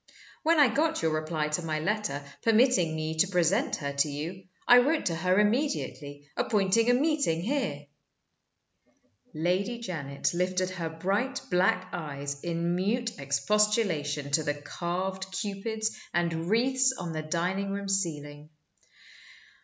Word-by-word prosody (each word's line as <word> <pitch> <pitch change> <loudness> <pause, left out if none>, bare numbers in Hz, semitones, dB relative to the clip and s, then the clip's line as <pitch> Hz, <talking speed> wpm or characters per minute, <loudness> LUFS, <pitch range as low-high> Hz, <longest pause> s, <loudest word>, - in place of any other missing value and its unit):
When 325 0 +3
I 285 - +8
got 315 - +1
your 160 - +2
reply 155 -1 -1
to 150 +3 -1
my 160 -2 -2
letter, 190 -4 -1 0.2
permitting 225 -8 +3
me 155 0 -3
to 195 - +4
present 195 - +2
her 140 -1 -4
to 140 +2 +1
you, 165 +6 -5 0.2
I 245 - +9
wrote 295 +5 +1
to 165 - 0
her 185 +4 +2
immediately, 205 - -1
appointing 210 +2 +2
a 245 - +5
meeting 280 - +1
here." 270 +5 -2 1.5
Lady 185 +9 0
Janet 155 -12 -3
lifted 185 +1 0
her 170 -3 -4
bright 195 +11 -1
black 185 +1 +2
eyes 140 -3 -4
in 170 0 -1
mute 220 - -1
expostulation 150 -1 +1
to 155 - +3
the 145 -1 -1
carved 185 +5 -4
Cupids 220 +3 -3 0.2
and 170 -1 0
wreaths 260 +4 +3
on 175 -2 -5
the 155 - -2
dining 180 +5 -1
room 200 0 -3
ceiling. 150 -6 -2
185 Hz, 140 wpm, -28 LUFS, 155-220 Hz, 1.5 s, I